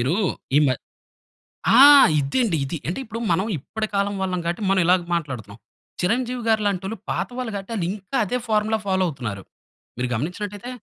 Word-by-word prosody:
మీరు 130 +7 +1 0.4
ఈ - - +8
మ - - +3 1.1
ఆ! - - +8 0.4
ఇదే 140 - -1
అండి, 185 -8 0
ఇది. 150 +5 -4
అంటే 180 - -3
ఇప్పుడు 225 +1 -6
మనం 185 +4 +2
ఇప్పటి 215 +10 -4
కాలం 200 0 +1
వాళ్ళం 185 -1 -1
కాబట్టి 170 +5 -2
మనం 195 -1 +3
ఇలాగ 180 +1 +4
మాట్లాడుతున్నాం. 125 -10 -5 0.4
చిరంజీవి 245 +5 -1
గారి 220 -1 +3
లాంటోళ్ళు 195 +2 -2
పాత - - -1
వాళ్ళు 250 -3 -3
కాబట్టి 195 +3 -6
ఆళ్ళింకా 195 +6 -3
అదే 250 +6 -1
ఫార్ములా 215 0 +1
ఫాలో 190 -1 +1
అవుతున్నారు. 120 - -5 0.5
మీరు 125 +1 -1
గమనించినట్లయితే 200 - -4
190 Hz, 165 wpm, -23 LUFS, 165-220 Hz, 1.1 s, ఈ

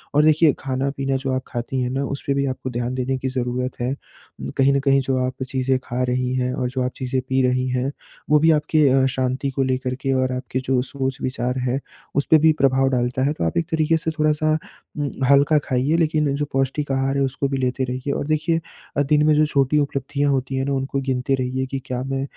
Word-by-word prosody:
और 150 - +5
देखिए 155 -1 +5
खाना-पीना 135 0 -2
जो 135 0 -3
आप 130 0 -1
खाती 120 +1 -3
हैं 125 - -1
ना 135 +2 -1
उसपे 140 0 -2
भी 140 0 0
आपको 130 -1 -3
ध्यान 120 0 -2
देने 130 +1 -1
की 130 - -3
ज़रूरत 125 0 -3
है। 125 +2 0
उम, 140 - -10
कहीं 135 +1 +4
न 140 - +2
कहीं 135 0 +3
जो 130 0 -1
आप 130 - -2 0.2
चीज़ें 130 0 +1
खा 125 0 -3
रही 125 0 0
हैं 125 0 0
और 125 -1 -1
जो 130 +1 -3
आप 125 - -1
चीज़ें 130 0 -2
पी 130 0 +2
रही 125 0 0
हैं, 125 +2 -1 0.4
वो 150 0 +5
भी 160 +2 +5
आपके 150 -1 +3
अ, 130 0 +4
शांति 130 +1 -1
को 135 +1 0
लेकर 130 -1 -1
के 135 0 0
और 130 0 +1
आपके 130 0 -3
जो 130 -1 +2
सोच-विचार 130 -1 -3
है 125 +1 0 0.4
उस 140 - +2
पे 160 - +9
भी 160 +1 +5
प्रभाव 135 0 +3
डालता 125 0 0
है। 145 - +1
तो 150 - -4
आप 80 - -1
एक 170 - +1
तरीके 160 0 +2
से 160 0 -2
थोड़ा-सा 155 0 +2 0.4
उम, 145 -1 -1 0.2
हल्का 140 +2 +5
खाइए 135 +5 +1
लेकिन 155 -3 +1
जो 145 - -1
पौष्टिक 135 +2 0
आहार 135 +1 0
है 140 - +2
उसको 135 +1 -1
भी 135 - -2
लेते 130 0 -1
रहिए। 130 +2 -2
और 145 - -3
देखिए 155 +2 +1 0.4
अ, - - +4
दिन 150 +1 +3
में 155 - +5
जो 155 - +4
छोटी 140 -1 +2
उपलब्धियाँ 140 0 0
होती 135 0 -1
हैं 130 0 0
ना 140 - -1
उनको 135 +1 -1
गिनते 130 0 -1
रहिए 130 0 -2
कि 135 - -2
क्या 125 -1 -3
मैं 135 0 -2
135 Hz, 235 wpm, -22 LUFS, 130-140 Hz, 0.4 s, पे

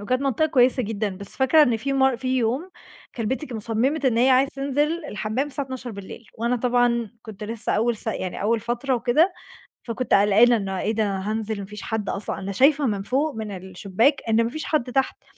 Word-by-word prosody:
وكانت 255 +6 -1
منطقة 275 +3 +1
كويسة 255 -3 +3
جدًا، 215 -1 -2
بس 200 0 -8
فاكرة 275 +4 +5
إن 240 -5 +3
في 275 +5 -3
مر 265 -2 +3
في 255 +1 -1
يوم 255 +10 -1 0.4
كلبتي 260 +5 -2
ك 240 - -6
صمّمت 240 +8 -1
إن 240 -3 +2
هي 255 +3 +4
عايزة 265 +2 +4
تنزل 290 +4 -1
الحمّام 220 +2 -2
الساعة 285 0 -4
24:00 240 -4 -8
وأنا 235 +2 +1
طبعًا 240 -2 +1
كنت 215 -2 -9
لسه 225 +1 -3
أول 230 +2 +1
س - - -9
يعني 190 -5 -3
أول 220 +2 +1
فترة 240 +4 -1
وكده، 250 +10 +2 0.5
فكنت 245 +2 -2
قلقانة 210 +4 +5
إنه 195 -2 -3
إيه 215 - 0
ده! 210 -3 0
هانزل 215 +2 -3
وما 200 - -5
فيش 210 0 -9
حَد 220 -2 -3
أصلًا، 200 - -4
أنا 195 +1 -4
شايفة 275 +7 +4
من 205 -4 -1
فوق 275 +8 0
من 220 -1 -5
الشباك 190 +8 0
إن 225 +1 +4
ما 230 - -1
فيش 310 +5 -5
حَد 265 -5 -1
تحت، 270 +1 -1
235 Hz, 205 wpm, -23 LUFS, 215-265 Hz, 0.5 s, فاكرة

